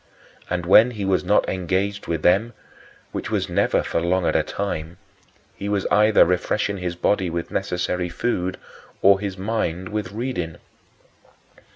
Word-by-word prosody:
And 90 Hz, -1 st, -2 dB
when 110 Hz, +6 st, +7 dB
he 105 Hz, -5 st, -4 dB
was 95 Hz, -1 st, +1 dB
not -, -, +2 dB
engaged 95 Hz, +3 st, -2 dB
with 80 Hz, -2 st, -2 dB
them 105 Hz, +7 st, +3 dB, 0.6 s
which -, -, -4 dB
was -, -, -1 dB
never -, -, +1 dB
for 85 Hz, -, -1 dB
long 90 Hz, +1 st, +1 dB
at -, -, +1 dB
a -, -, +4 dB
time 85 Hz, -4 st, -4 dB, 0.6 s
he 100 Hz, -, -5 dB
was 100 Hz, -2 st, 0 dB
either 105 Hz, 0 st, +5 dB
refreshing 100 Hz, +3 st, 0 dB
his 90 Hz, -1 st, -3 dB
body 95 Hz, +1 st, +1 dB
with 85 Hz, 0 st, -4 dB
necessary 90 Hz, 0 st, -2 dB
food 90 Hz, -1 st, -2 dB, 0.5 s
or 100 Hz, 0 st, +6 dB
his 100 Hz, -2 st, -4 dB
mind 95 Hz, -3 st, -2 dB
with 105 Hz, -3 st, -3 dB
reading. 105 Hz, -8 st, -4 dB
95 Hz, 155 wpm, -22 LUFS, 90-105 Hz, 0.6 s, when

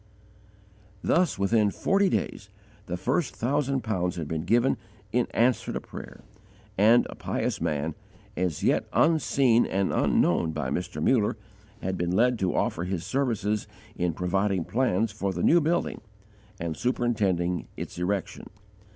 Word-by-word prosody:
Thus, 180 Hz, +1 st, +2 dB
within 105 Hz, +2 st, +3 dB
forty 195 Hz, -, +2 dB
days, 105 Hz, -, -2 dB, 0.4 s
the 90 Hz, -, -3 dB
first 130 Hz, -, -1 dB
thousand 135 Hz, +1 st, 0 dB
pounds 90 Hz, -5 st, -1 dB
had 80 Hz, -4 st, -4 dB
been 80 Hz, +1 st, -3 dB
given 120 Hz, +7 st, +3 dB, 0.3 s
in 120 Hz, +1 st, +1 dB
answer 120 Hz, +2 st, +1 dB
to -, -, -2 dB
prayer, -, -, -10 dB, 0.5 s
and 110 Hz, +5 st, +5 dB
a -, -, -8 dB
pious -, -, -2 dB
man, 75 Hz, +1 st, -1 dB, 0.4 s
as 90 Hz, -4 st, -2 dB
yet -, -, +2 dB
unseen 140 Hz, -7 st, +3 dB
and 95 Hz, 0 st, 0 dB
unknown 80 Hz, -1 st, +2 dB
by 70 Hz, -4 st, -3 dB
Mr. 85 Hz, -2 st, -3 dB
Muller, 110 Hz, -2 st, +2 dB, 0.5 s
had 95 Hz, 0 st, -2 dB
been 85 Hz, 0 st, 0 dB
led 120 Hz, +2 st, +3 dB
to 95 Hz, -2 st, 0 dB
offer 85 Hz, -, 0 dB
his 90 Hz, -2 st, -3 dB
services 110 Hz, -6 st, -1 dB, 0.3 s
in 90 Hz, -1 st, 0 dB
providing 95 Hz, +1 st, 0 dB
plans 115 Hz, -3 st, +1 dB
for 100 Hz, -2 st, -2 dB
the -, -, -3 dB
new 170 Hz, +1 st, +5 dB
building 165 Hz, +3 st, 0 dB, 0.6 s
and 85 Hz, -1 st, -3 dB
superintending 100 Hz, -7 st, 0 dB
its -, -, -6 dB
erection. 95 Hz, +2 st, -3 dB
100 Hz, 140 wpm, -27 LUFS, 90-125 Hz, 0.6 s, and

